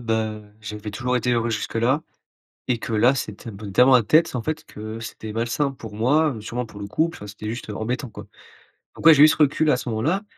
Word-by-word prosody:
bah 110 -2 -2 0.2
j'avais 105 0 -6
toujours 125 +4 -1
été 125 +1 0
heureux 120 -1 +1
jusque-là 115 +6 0 0.7
et 125 -2 +1
que 115 - -6
là, 120 +5 +4
c'était 110 -2 -5
un 100 - -9
peu 100 -1 -8
tellement 130 +6 +6
la 120 - +4
tête, 155 +4 +3
en 120 - -1
fait, 155 0 -3
que 110 +1 -8
c'était 110 -1 -7
malsain 120 +5 0
pour 110 -5 -10
moi, 140 +5 +2
sûrement 120 +3 -4
pour 105 - -12
le - - -4
couple, 160 +11 -1
enfin, 105 - -9
c'était 105 +1 -8
juste 115 -1 -6
embêtant 120 +5 -3
quoi, 105 -1 -11 0.7
donc - - -10
ouais, 165 - +10
j'ai 150 0 +7
eu - - +10
ce - - +2
recul 155 +1 +3
à 125 - +4
ce 125 - -5
moment-là 150 - 0
115 Hz, 230 wpm, -23 LUFS, 110-135 Hz, 0.7 s, ouais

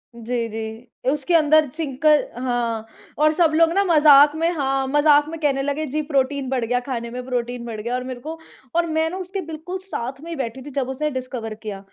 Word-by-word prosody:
जी, 235 0 -2
जी। 220 +2 -6 0.2
उसके 300 +3 -1
अंदर 310 -1 +5
चिक 280 0 -5 0.3
हाँ, 240 -3 -1 0.3
और 305 +1 +4
सब 330 -1 +3
लोग 330 0 +5
न 400 - +5
मज़ाक 295 -2 +7
में 330 +1 +1
हाँ, 270 -2 0
मज़ाक 295 +1 +4
में 330 0 -6
कहने 275 -3 +1
लगे 285 +3 -1
जी 300 +3 -2
प्रोटीन 280 -2 0
बढ़ 255 -3 0
गया 245 +2 +1
खाने 240 -2 -4
में 250 0 -5
प्रोटीन 245 -1 -3
बढ़ 225 -2 -6
गया 235 +3 -3
और 250 - -2
मेरे 255 -1 -6
को 315 +5 -7 0.4
और 340 0 +3
मैं 320 0 +1
ना 370 - -5
उसके 380 +1 -4
बिल्कुल 325 +3 -6
साथ 270 -7 -5
में 335 - -8
ही - - -3
बैठी 260 0 -4
थी 290 - -7
जब 260 -1 -2
उसने 300 +3 -1
डिस्कवर 250 -4 -5
किया, 205 -3 -5
275 Hz, 215 wpm, -22 LUFS, 245-310 Hz, 0.4 s, मज़ाक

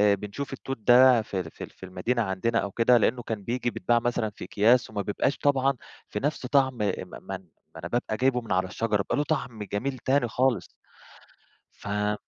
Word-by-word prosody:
بنشوف 105 +8 -6
التوت 135 0 -5
ده 120 +1 +6
في 100 -3 -4
ال 80 -3 -5
في - - -9
ال - - -7
في 95 - -12
المدينة 115 +7 -1
عندنا 110 +4 0
أو 100 - -3
كده 120 +3 +4
لإنه 120 +1 +1
كان 110 -3 -4
بييجي 120 +2 -1
بيتباع 120 0 +1
مثلًا 120 -2 -1
في 100 - -11
أكياس 115 +6 +3
وما 105 -2 -3
بيبقاش 105 +7 -1
طبعًا 135 -1 +2 0.4
في - - -3
نُفْس 145 -2 -2
طَعم 130 -1 +2
م - - -12 0.5
ما 95 -1 -5 0.4
أنا 85 - -5
بابقى 110 -1 -1
جايبه 125 -1 +2
من 115 - -9
على 95 0 +1
الشجرة 110 +2 0
بيبقى 100 - -1
له 145 - +2
طَعم 125 -8 -3
جميل 125 +7 -3
تاني 130 0 +2
خالص. 125 +1 +1 1.1
ف 105 0 -2
115 Hz, 195 wpm, -27 LUFS, 105-130 Hz, 1.1 s, ده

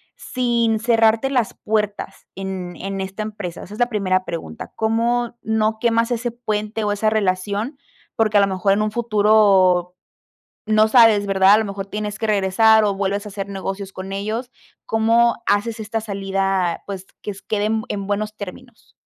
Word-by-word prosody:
sin 235 -3 0
cerrarte 225 +2 +3
las 250 -5 0
puertas 210 -2 -3
en 190 -2 -5
en 195 +2 -5
esta 190 +2 -5
empresa? 205 -5 -6
Esa 205 - -11
es - - -12
la 245 0 +2
primera 185 -4 0
pregunta, 120 - -7
¿cómo 235 +2 0
no 220 0 0
quemas 230 0 +2
ese 240 0 -1
puente 215 -2 -3
o 205 - 0
esa 205 +1 +1
relación? 205 +5 -1 0.4
Porque 215 -2 +2
a - - +6
lo 200 - +3
mejor 195 +1 +1
en 205 - +1
un 215 0 0
futuro 205 -5 +3 0.7
no 215 0 +4
sabes, 220 -3 +5
¿verdad? 195 0 +5
A - - +6
lo 220 - 0
mejor 195 -1 -6
tienes 210 +1 -5
que 220 - -1
regresar 215 +2 +4
o 205 -1 +1
vuelves 200 +1 -2
a - - -6
hacer 195 -1 -5
negocios 195 0 -5
con 190 +1 -7
ellos, 220 +5 -4 0.3
¿cómo 230 +1 +3
haces 215 +3 0
esta 220 +1 -3
salida? 195 -3 -1
Pues, 190 -1 -7
que 210 - -4
s 195 - -11
quede 210 -1 0
en 220 +1 0
en 200 -1 -3
buenos 210 +1 -2
términos. 220 +4 -11
210 Hz, 175 wpm, -21 LUFS, 195-225 Hz, 0.7 s, a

